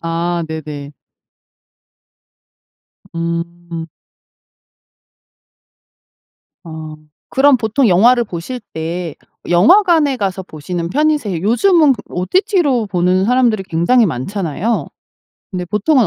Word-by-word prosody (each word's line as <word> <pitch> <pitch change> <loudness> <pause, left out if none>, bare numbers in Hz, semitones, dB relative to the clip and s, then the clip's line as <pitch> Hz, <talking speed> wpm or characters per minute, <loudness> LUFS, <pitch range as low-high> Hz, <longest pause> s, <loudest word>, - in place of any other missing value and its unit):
아 170 +1 -2
네네. 150 -2 -7 2.2
음. 170 0 -4 2.8
아. 160 -2 -8 0.3
그럼 275 0 +4
보통 230 +2 +1
영화를 235 +7 +4
보실 205 +7 -6
때 165 0 -4 0.4
영화관에 305 - +4
가서 195 -4 -2
보시는 170 0 -5
편이세 290 - 0
요즘은 300 - +4
그 235 - -7
OTT로 280 - +1
보는 185 0 +1
사람들이 240 -4 +2
굉장히 190 +8 +2
많잖아요. 185 - -2 0.6
근데 180 -2 -4
보통은 215 - +2
190 Hz, 200 characters per minute, -16 LUFS, 170-250 Hz, 2.8 s, 그럼